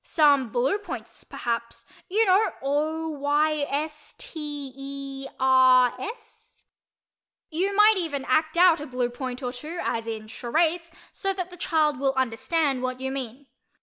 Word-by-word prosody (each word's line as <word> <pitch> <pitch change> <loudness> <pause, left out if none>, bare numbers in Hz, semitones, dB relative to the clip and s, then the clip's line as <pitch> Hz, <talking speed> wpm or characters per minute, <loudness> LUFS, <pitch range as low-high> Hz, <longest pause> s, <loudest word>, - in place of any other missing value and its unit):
"Some 285 -6 +3
blue 255 - +1
points, 410 - -8
perhaps—you 240 - -3
know, 395 +3 +3
o 310 +3 -1
y 300 +1 +1
s 300 +1 -4
t 295 - -6
e 275 0 -6
r 255 -1 +5
s?" 450 +2 -10 0.9
You 380 +5 0
might 420 +1 +6
even 290 -7 -2
act 315 +5 +1
out 350 -2 +6
a 295 - -6
blue 250 -1 -1
point 255 +1 -5
or 250 0 -3
two, 305 +7 -7
as 230 0 -2
in 220 -1 -5
charades, 325 +9 0 0.2
so 390 -1 -2
that 365 -2 -5
the - - -9
child 310 -5 +1
will 270 -1 +1
understand 265 +3 0
what 255 0 -3
you 265 0 -3
mean. 265 0 -6
290 Hz, 150 wpm, -25 LUFS, 260-335 Hz, 0.9 s, might